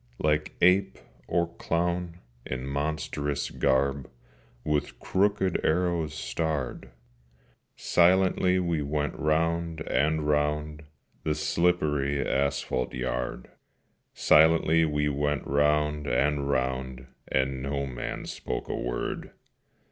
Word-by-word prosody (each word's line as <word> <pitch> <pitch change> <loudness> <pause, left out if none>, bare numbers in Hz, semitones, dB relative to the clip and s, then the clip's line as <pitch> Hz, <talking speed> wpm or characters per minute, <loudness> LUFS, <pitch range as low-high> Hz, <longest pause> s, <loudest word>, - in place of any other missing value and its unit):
Like 75 0 0
ape 90 +3 +4 0.3
or 85 -1 0
clown, 85 0 -1 0.3
in 65 0 -5
monstrous 75 0 -2
garb 70 0 +1 0.5
With 75 0 -1
crooked 95 -1 +1
arrows 85 -2 0
starred, 70 -1 -3 0.9
Silently 90 +1 +3
we 85 -4 0
went 75 0 -1
round 80 +1 0
and 75 +2 0
round 75 +1 0 0.4
The 75 - -1
slippery 75 -3 +1
asphalte 70 -3 -1
yard; 60 0 -3 0.6
Silently 80 +1 +5
we 75 -1 0
went 75 0 -1
round 75 +1 +1
and 70 +3 +1
round, 65 -1 -2 0.2
And 65 0 0
no 70 +1 -2
man 65 -3 -5
spoke - - -5
a - - -1
word. - - -3
75 Hz, 100 wpm, -27 LUFS, 70-80 Hz, 0.9 s, Silently